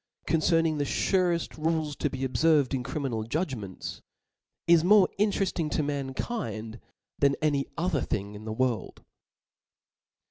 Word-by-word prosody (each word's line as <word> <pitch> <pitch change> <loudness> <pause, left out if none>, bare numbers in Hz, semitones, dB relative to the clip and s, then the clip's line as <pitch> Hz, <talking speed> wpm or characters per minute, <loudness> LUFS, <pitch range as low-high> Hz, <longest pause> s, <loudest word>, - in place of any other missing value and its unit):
concerning 165 -1 +2
the - - +2
fureft 175 +1 0
rules 160 -2 0
to 150 - -1
be 135 0 -2
obferired 145 -1 +3
in 130 - 0
crimi* 135 +1 -3
nal 110 -1 -2
judgments, 115 - -4 0.6
is 170 -1 +5
more 195 0 +6
interefting 195 -6 +1
to 150 - 0
mankind 130 - -4 0.4
than 140 -1 +4
any 145 -3 +1
other 165 -5 0
thing 100 -2 -3
in 105 +1 -9
the 110 - -5
world. 120 -2 -2
145 Hz, 135 wpm, -28 LUFS, 125-165 Hz, 0.6 s, more